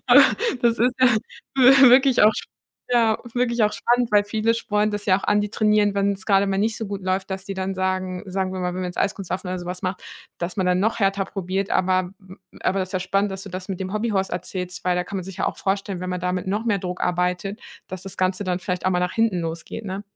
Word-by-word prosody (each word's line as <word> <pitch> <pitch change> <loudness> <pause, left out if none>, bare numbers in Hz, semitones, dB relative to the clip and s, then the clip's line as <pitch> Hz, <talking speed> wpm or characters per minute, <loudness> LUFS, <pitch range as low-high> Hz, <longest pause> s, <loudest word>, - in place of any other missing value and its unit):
aber - - +8 0.4
das 235 -1 +3
ist 245 +2 +2
ja 255 - +7 0.5
wi 265 0 +8
wirklich 265 0 +5
auch 215 +1 +7
sp - - -6 0.4
ja, 225 -2 +3 0.2
wirklich 240 -2 +1
auch 210 - +3
spannend, 240 -1 +1
weil 205 0 +5
viele 220 +2 +1
spornt 210 -2 0
das 205 0 -4
ja 185 - +5
auch - - -12
an, 210 0 +3
die 205 - -2
trainieren, 210 -1 +2
wenn's 200 0 -1
grade 200 -1 +4
mal 195 - 0
nicht 220 +2 0
so 225 - -4
gut 200 -2 -5
läuft, 190 +1 -1
dass 190 0 -4
die 195 -1 -5
dann 190 0 -2
sagen 185 -1 -2
sagen 190 0 -2
wir 185 - -4
mal, 180 - -1
wenn 180 +1 -4
man 185 - -2
jetzt 180 - -7
Eiskunstlaufen 190 -2 -2
oder 180 0 -3
so 175 - -8
was 180 +1 -5
macht, 185 0 -3 0.4
dass 175 +3 -4
man 190 - 0
dann 180 0 +2
noch 220 +4 +1
härter 195 -1 +1
probiert. 195 0 -3
Aber 185 -1 +1
m 190 0 -14 0.2
aber 190 0 +1
ist 185 +2 -7
ja 185 - 0
spannend, 195 +2 0
dass 190 0 -6
du 200 - -8
das 185 +1 -7
mit 190 - -4
dem 190 +1 -4
Hobbyhorse 210 -3 -1
erzählst, 180 0 -5
weil 180 -1 +2
da 180 - 0
kann 200 - -6
man 180 - -5
sich 190 -2 -9
ja - - 0
auch - - -2
vorstellen, 195 -1 -2
wenn 185 0 -4
man 180 - -2
da 180 0 -1
mit 185 0 -3
noch 210 +3 -1
mehr 215 -4 +1
Druck 180 -1 -5
arbeitet, 180 +3 -1 0.3
dass 185 0 -7
das 195 -1 -7
Ganze 185 +1 0
dann 180 -1 -1
vielleicht 180 -1 -4
auch 185 - +3
mal 180 - +1
nach 180 0 -1
hinten 225 -6 +1
losgeht, 165 +6 -5
ne? 195 +1 -5
195 Hz, 265 wpm, -23 LUFS, 185-210 Hz, 0.5 s, aber